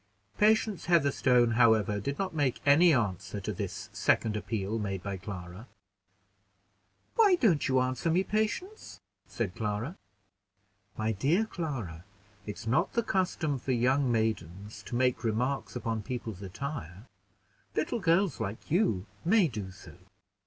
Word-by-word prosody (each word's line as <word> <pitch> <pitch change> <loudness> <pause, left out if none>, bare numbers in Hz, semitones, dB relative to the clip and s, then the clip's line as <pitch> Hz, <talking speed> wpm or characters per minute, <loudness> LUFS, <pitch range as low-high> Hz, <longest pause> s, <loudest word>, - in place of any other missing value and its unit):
Patience 215 -2 +3
Heatherstone, 135 -7 +3
however, 110 -3 +3
did 140 +8 -3
not 190 -2 -2
make 145 -5 0
any 160 +5 +6
answer 100 - -1
to 95 - -4
this - - -5
second 110 -2 +1
appeal 105 0 -2
made 95 -3 -3
by 100 -1 -3
Clara. 90 +2 -8 1.5
"Why 420 -5 +5
don't 200 - +2
you 130 -1 +3
answer 130 +5 0
me, 175 +4 +3
Patience?", 220 - -3 0.3
said 105 -6 -3
Clara. 110 - -3 1.0
"My 110 +1 0
dear 145 - +2
Clara, 130 - -5 0.4
it's 105 +1 -6
not 145 +11 +1
the 235 - +1
custom 175 -8 0
for 130 +2 -1
young 130 +2 +2
maidens 105 -3 -2
to - - -4
make 125 0 +1
remarks 125 +6 -1
upon 115 -2 -2
people's 110 -4 -5
attire. 100 - -6 0.7
Little 240 - -1
girls 180 -2 +2
like 100 +7 -5
you 165 - +2 0.2
may 190 +1 +4
do 105 -8 -5
so." 95 +1 -13
125 Hz, 135 wpm, -30 LUFS, 105-165 Hz, 1.5 s, any